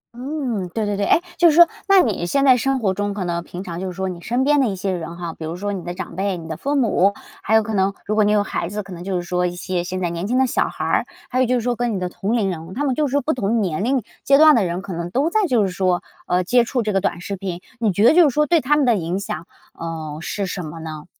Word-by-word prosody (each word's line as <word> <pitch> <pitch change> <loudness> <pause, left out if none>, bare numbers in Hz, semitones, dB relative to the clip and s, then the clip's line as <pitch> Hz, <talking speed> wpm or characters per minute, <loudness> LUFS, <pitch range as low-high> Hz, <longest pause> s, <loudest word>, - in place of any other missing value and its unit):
嗯， 250 - -3
对 220 -2 0
对- 205 -1 -1
对。 200 - -1
哎， - - +5 0.2
就 345 -1 +7
是 300 - +2
说， 345 0 +9 0.2
那 390 -1 +7
你 210 -7 -1
现 275 +7 +2
在 260 -2 +7
生 270 +2 0
活 195 -4 +1
中 205 +1 -2
可 190 - -3
能 170 -1 -2
平 180 +2 -8
常 170 -2 -6
就 190 - -3
是 180 - -5
说 190 +1 -3
你 175 -1 -7
身 245 +6 0
边 290 +1 +3
的 255 - +2
一 195 - -2
些 190 +1 -2
人 170 -1 -5
哈， 170 -2 -5
比 160 - -10
如 160 +2 -4
说 205 +2 -3
你 185 - -5
的 175 0 -5
长 175 - -7
辈、 195 -1 -1
你 160 - -9
的 160 - -4
父 280 - -2
母， 205 -7 +3 0.3
还 220 - +1
有 220 - +5
可 220 0 -4
能 195 0 +2
如 210 - -1
果 215 0 +3
你 205 - +3
有 205 -1 +3
孩 170 - -3
子， 205 +1 -4
可 190 -1 -10
能 175 0 -8
就 190 -1 -2
是 175 - -1
说 180 0 0
一 175 - -5
些 175 0 -2
现 185 +1 -4
在 175 -2 -1
年 170 +3 -3
轻 250 +2 +1
的 265 - +4
小 - - +1
孩 - - -5
儿， - - +1 0.3
还 255 - 0
有 255 - +3
就 250 - +2
是 240 - 0
说 245 +1 0
跟 240 -2 -1
你 - - -2
的 180 -1 -2
同 200 +5 -3
龄 205 - +1
人， 165 +2 -7
他 285 - -1
们 270 -3 +1
就 295 +2 +1
是 - - -6
说 285 0 +2
不 315 - 0
同 230 -1 0
年 190 -1 -1
龄 255 0 +1 0.2
阶 275 0 +5
段 310 -1 +7
的 220 - +3
人， 175 +2 -3
可 190 - -6
能 170 +1 -4
都 285 - 0
在 430 -3 +2
就 240 -8 +3
是 - - -1
说， 180 -1 0 0.2
呃， 180 +1 +1
接 245 +5 +3
触 240 0 -1
这 210 -1 -1
个 195 - +2
短 170 - -1
视 195 +3 -5
频。 185 -2 -5 0.2
你 220 -3 +2
觉 200 +3 +1
得 - - +7
就 335 -4 +6
是 - - -3
说 300 0 +3
对 335 0 +3
他 295 +4 +2
们 285 - +3
的 235 -3 +4
影 175 +1 -2
响， 185 -3 -5 0.3
呃， 160 -2 -6
是 200 +2 -3
什 180 0 -4
么 160 +1 -8
呢？ 155 -2 -7
200 Hz, 345 characters per minute, -21 LUFS, 180-250 Hz, 0.3 s, 说